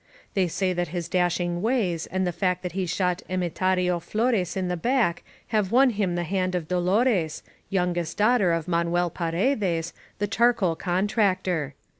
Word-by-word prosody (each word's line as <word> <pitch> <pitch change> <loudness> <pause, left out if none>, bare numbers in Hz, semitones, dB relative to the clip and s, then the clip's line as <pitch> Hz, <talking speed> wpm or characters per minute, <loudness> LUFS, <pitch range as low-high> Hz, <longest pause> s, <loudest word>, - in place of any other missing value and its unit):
They 190 -2 +2
say 185 +2 -1
that 175 0 -1
his 170 +1 -4
dashing 175 -1 0
ways 205 -8 0
and 185 0 -1
the 180 - 0
fact 180 0 -1
that 180 - -3
he 185 +1 -2
shot 180 0 0
Emetario 180 0 0
Flores 210 -1 0
in 185 -1 -1
the 180 - -1
back 230 -2 +1 0.3
have 210 -4 0
won 255 +2 +5
him 200 -5 -1
the 175 - -1
hand 185 +1 -1
of 170 -3 -3
Dolores, 180 -1 +1 0.3
youngest 175 -3 -1
daughter 210 -4 +3
of 165 0 -1
Manuel 170 0 +1
Faredes, 175 - -1 0.2
the 205 - 0
charcoal 220 -5 +2
contractor. 185 - 0
180 Hz, 160 wpm, -25 LUFS, 175-200 Hz, 0.3 s, won